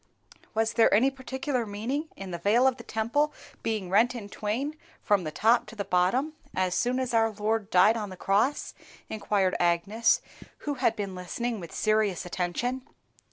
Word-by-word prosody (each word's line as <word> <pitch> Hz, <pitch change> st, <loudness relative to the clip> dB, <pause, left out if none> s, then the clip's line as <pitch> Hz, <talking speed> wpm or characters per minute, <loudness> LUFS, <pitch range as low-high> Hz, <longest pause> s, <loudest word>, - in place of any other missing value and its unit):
"Was 225 Hz, 0 st, +1 dB
there 230 Hz, -, +5 dB
any 250 Hz, +7 st, +4 dB
particular 265 Hz, -1 st, -3 dB
meaning 235 Hz, +9 st, -3 dB
in 195 Hz, -1 st, -7 dB
the 170 Hz, -, -4 dB
veil 215 Hz, +8 st, +3 dB
of 260 Hz, -1 st, +3 dB
the 235 Hz, -, -10 dB
Temple 240 Hz, +9 st, 0 dB, 0.3 s
being 215 Hz, -4 st, -2 dB
rent 235 Hz, +6 st, +4 dB
in 210 Hz, -4 st, -7 dB
twain 245 Hz, +11 st, -3 dB, 0.3 s
from 205 Hz, -3 st, +2 dB
the 155 Hz, -, -3 dB
top 230 Hz, +8 st, +3 dB
to -, -, -10 dB
the 200 Hz, -2 st, -3 dB
bottom, 200 Hz, +12 st, +1 dB, 0.2 s
as 185 Hz, -1 st, +1 dB
soon 250 Hz, +5 st, +1 dB
as 255 Hz, -2 st, -2 dB
our 225 Hz, -1 st, +4 dB
Lord 215 Hz, 0 st, -1 dB
died 210 Hz, +4 st, +5 dB
on 210 Hz, -3 st, -3 dB
the 185 Hz, -, -9 dB
cross?" 205 Hz, +11 st, +1 dB, 0.4 s
inquired 200 Hz, -3 st, 0 dB
Agnes, 175 Hz, +7 st, +2 dB, 0.5 s
who 295 Hz, -, 0 dB
had 225 Hz, -4 st, +3 dB
been 200 Hz, -2 st, -4 dB
listening 220 Hz, +6 st, -3 dB
with 170 Hz, -3 st, -9 dB
serious 215 Hz, -5 st, +1 dB
attention. 185 Hz, +9 st, -2 dB
220 Hz, 175 wpm, -28 LUFS, 195-245 Hz, 0.5 s, there